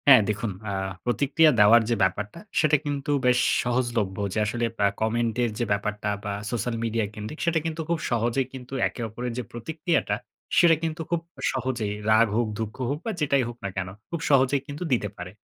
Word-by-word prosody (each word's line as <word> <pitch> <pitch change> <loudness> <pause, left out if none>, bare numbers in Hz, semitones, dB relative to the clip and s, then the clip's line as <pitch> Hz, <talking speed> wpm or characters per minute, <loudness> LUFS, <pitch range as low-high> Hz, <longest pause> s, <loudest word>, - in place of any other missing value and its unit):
হ্যাঁ, 130 -5 +9
দেখুন 105 +1 -1 0.2
আ - - -2 0.3
প্রতিক্রিয়া 145 +5 +4
দেওয়ার 110 +3 +8
যে 120 - +3
ব্যাপারটা, 105 - -1 0.2
সেটা 150 -1 +4
কিন্তু 145 0 -2
বেশ 125 0 +4 0.2
সহজলভ্য। 120 -5 0 0.2
যে - - -3
আসলে 120 +3 -1 0.2
আ - - +3
কমেন্টের 115 +1 +1
যে 120 - +1
ব্যাপারটা 105 +1 -1
বা 100 - -2 0.2
সোশ্যাল 120 0 -1
মিডিয়া 115 -1 0
কেন্দ্রিক 105 +9 -7
সেটা 170 -1 +2
কিন্তু 160 0 -2
খুব 170 -1 +1
সহজেই 120 +3 +1
কিন্তু 130 0 -9
একে - - -8
অপরের 120 +2 -4
যে 125 - -2
প্রতিক্রিয়াটা 160 - -1 0.4
সেটা 170 -2 +7
কিন্তু 165 0 -2
খুব 170 -1 +1 0.3
সহজেই 125 -5 -2 0.2
রাগ 110 +1 +6
হোক, 120 0 +2
দুঃখ 110 -1 -3
হোক 145 +2 -1
বা 225 - -1
যেটাই 140 -3 +3
হোক 120 - -9
না - - -1
কেন, 95 -1 -1 0.2
খুব 170 - -3
সহজেই 135 0 +4
কিন্তু 145 +4 -5
দিতে 105 -4 0
পারে। 90 +1 -7
120 Hz, 185 wpm, -26 LUFS, 110-140 Hz, 0.4 s, হ্যাঁ